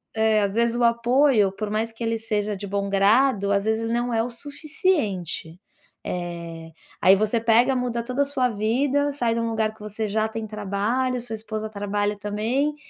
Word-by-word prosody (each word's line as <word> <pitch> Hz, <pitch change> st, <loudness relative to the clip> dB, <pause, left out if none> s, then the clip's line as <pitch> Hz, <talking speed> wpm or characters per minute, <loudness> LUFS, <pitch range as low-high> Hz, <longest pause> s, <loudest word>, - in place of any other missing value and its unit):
É, 220 Hz, -1 st, +3 dB
às 200 Hz, +1 st, -1 dB
vezes 235 Hz, 0 st, +2 dB
o 240 Hz, -, +1 dB
apoio, 235 Hz, -2 st, +3 dB
por 205 Hz, +2 st, -5 dB
mais 220 Hz, +2 st, -1 dB
que 225 Hz, +1 st, -8 dB
ele 225 Hz, 0 st, 0 dB
seja 210 Hz, -2 st, -2 dB
de 200 Hz, -, -6 dB
bom 200 Hz, 0 st, -2 dB
grado, 200 Hz, +1 st, +3 dB
às 200 Hz, 0 st, +2 dB
vezes 220 Hz, +1 st, 0 dB
ele 225 Hz, +1 st, -2 dB
não 240 Hz, 0 st, 0 dB
é 225 Hz, 0 st, +2 dB
o 245 Hz, -, -3 dB
suficiente. 235 Hz, -, -2 dB, 0.5 s
Eh, 170 Hz, -2 st, -5 dB, 0.3 s
aí 190 Hz, +1 st, +7 dB
você 215 Hz, +3 st, +1 dB
pega, 235 Hz, +4 st, +4 dB
muda 245 Hz, -2 st, -1 dB
toda 255 Hz, +3 st, -1 dB
a -, -, +3 dB
sua 255 Hz, -3 st, +2 dB
vida, 260 Hz, +7 st, +1 dB
sai 240 Hz, -5 st, 0 dB
de 230 Hz, -, -1 dB
um 230 Hz, 0 st, -1 dB
lugar 220 Hz, -1 st, 0 dB
que 220 Hz, -, -23 dB
você 210 Hz, +1 st, -4 dB
já 215 Hz, +1 st, 0 dB
tem 225 Hz, 0 st, -5 dB
trabalho, 215 Hz, +5 st, -1 dB
sua 240 Hz, -1 st, -7 dB
esposa 220 Hz, 0 st, -5 dB
trabalha 205 Hz, 0 st, -2 dB
também. 225 Hz, +9 st, -1 dB
220 Hz, 195 wpm, -24 LUFS, 205-240 Hz, 0.5 s, aí